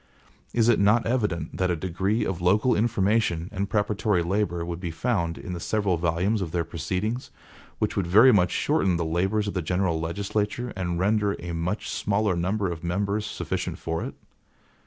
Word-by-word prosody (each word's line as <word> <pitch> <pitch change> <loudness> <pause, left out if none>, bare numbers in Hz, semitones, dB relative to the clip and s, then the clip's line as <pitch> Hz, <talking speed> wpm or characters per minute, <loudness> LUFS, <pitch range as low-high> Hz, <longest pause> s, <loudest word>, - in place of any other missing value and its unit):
Is 115 -1 +2
it 120 - +4
not 105 +4 +4
evident 105 -8 -1
that 90 -1 +1
a 90 - +1
degree 95 +6 -1
of 95 -2 -3
local 105 +8 +3
information 105 -5 +1
and 100 +1 -2
preparatory 105 -3 +1
labor 85 -2 -1
would 85 -1 -4
be 90 -2 -4
found 85 -2 -1
in 90 - -6
the 85 - -4
several 100 0 0
volumes 85 +6 0
of 90 - -2
their 85 -1 0
proceedings, 90 - -3 0.5
which - - -1
would 95 -3 0
very 110 +9 +7
much 90 -4 +4
shorten 90 +1 +1
the 85 - -1
labors 95 +6 0
of 100 - -2
the 90 - -1
general 90 0 0
legislature, 100 +7 -2
and 90 -2 -2
render 100 +2 +1
a 85 0 -6
much 85 +5 -2
smaller 105 -2 0
number 95 +2 0
of 85 -1 -7
members 100 +4 -1
sufficient 90 -4 -3
for 80 -2 -3
it? - - -6
95 Hz, 180 wpm, -26 LUFS, 85-105 Hz, 0.5 s, very